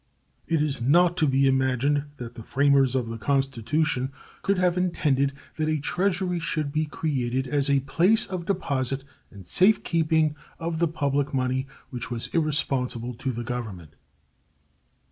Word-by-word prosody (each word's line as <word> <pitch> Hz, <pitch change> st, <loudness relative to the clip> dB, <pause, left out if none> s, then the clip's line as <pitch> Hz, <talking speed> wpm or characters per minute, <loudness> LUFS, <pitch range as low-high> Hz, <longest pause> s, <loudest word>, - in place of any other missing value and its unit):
It 160 Hz, -2 st, +2 dB
is 140 Hz, -4 st, -2 dB
not 170 Hz, +7 st, +4 dB
to 155 Hz, -, +3 dB
be 135 Hz, 0 st, +3 dB
imagined 135 Hz, +2 st, +1 dB
that 120 Hz, -2 st, -7 dB
the 115 Hz, -, -9 dB
framers 135 Hz, +1 st, +3 dB
of 125 Hz, -3 st, 0 dB
the 115 Hz, 0 st, -6 dB
Constitution 135 Hz, +2 st, 0 dB, 0.3 s
could 200 Hz, 0 st, +1 dB
have 180 Hz, -1 st, +2 dB
intended 145 Hz, -7 st, +1 dB, 0.3 s
that 155 Hz, 0 st, 0 dB
a 155 Hz, -, +1 dB
treasury 180 Hz, +3 st, 0 dB
should 155 Hz, -3 st, -1 dB
be 155 Hz, +1 st, 0 dB
created 130 Hz, -4 st, -1 dB
as 140 Hz, +2 st, 0 dB
a 140 Hz, -1 st, +3 dB
place 175 Hz, +11 st, +3 dB
of 180 Hz, -2 st, -5 dB
deposit 140 Hz, -8 st, -1 dB, 0.3 s
and 100 Hz, -3 st, -13 dB
safe 195 Hz, -, +4 dB
keeping 160 Hz, -2 st, +2 dB, 0.2 s
of 165 Hz, -1 st, -3 dB
the 170 Hz, -, +3 dB
public 145 Hz, -3 st, -1 dB
money 130 Hz, +1 st, 0 dB, 0.2 s
which 120 Hz, -2 st, -4 dB
was 120 Hz, -2 st, -5 dB
irresponsible 130 Hz, -6 st, 0 dB
to 130 Hz, +3 st, -3 dB
the 120 Hz, 0 st, -4 dB
Government. 110 Hz, -, -6 dB
140 Hz, 155 wpm, -25 LUFS, 130-160 Hz, 0.3 s, not